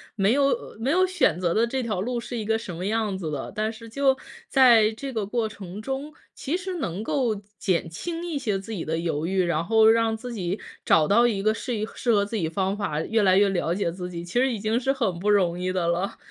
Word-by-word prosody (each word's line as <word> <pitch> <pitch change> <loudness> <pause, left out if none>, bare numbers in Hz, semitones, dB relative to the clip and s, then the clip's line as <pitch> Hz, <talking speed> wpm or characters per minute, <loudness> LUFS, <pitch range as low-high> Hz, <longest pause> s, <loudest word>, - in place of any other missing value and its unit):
没 200 -1 +2
有 275 -4 0
没 255 +5 0
有 370 +3 +4
选 365 - +2
择 175 -2 +1
的 230 +2 +2
这 260 +2 -2
条 215 -6 -2
路 245 +5 -2
是 235 +1 -6
一 215 - -3
个 220 +1 +1
什 195 -6 -7
么 175 +3 -5
样 215 -2 0
子 170 -4 -4
的。 140 -3 -4
但 215 +1 -1
是 230 0 -11
就 270 +2 +2 0.3
在 235 -5 +6
这 270 +5 -6
个 220 -4 -2
过 220 +1 -1
程 195 -1 -8
中， 270 +5 -4 0.2
其 295 +5 -3
实 375 0 -4
能 200 - -3
够 240 -2 0 0.2
减 175 -3 0
轻 335 - -5
一 325 -5 -2
些 210 -7 -1
自 195 +4 -8
己 195 -7 -4
的 160 +1 -1
犹 160 -2 -2
豫， 190 0 +1
然 170 -2 0
后 220 +3 +4
让 225 0 +4
自 245 +2 -7
己 190 -2 -3 0.2
找 155 -2 +4
到 235 +4 +5
一 200 -4 -1
个 215 +1 +3
适 240 +2 -4
宜 215 0 -1
适 235 - +1
合 205 -1 +3
自 215 +2 -3
己 165 - 0
方 190 +4 -1
法， 155 -7 -2
越 225 +6 +1
来 190 -2 +4
越 200 0 +5
了 175 -3 0
解 190 -3 -1
自 180 +1 -6
己， 170 -1 -6
其 175 - -10
实 265 +1 +3
已 230 - -2
经 220 +3 0
是 265 +2 +1
很 210 -11 -1
不 205 +4 0
容 180 -4 +3
易 185 0 -1
的 175 -2 0
了。 175 +3 -1
215 Hz, 275 characters per minute, -25 LUFS, 185-240 Hz, 0.3 s, 在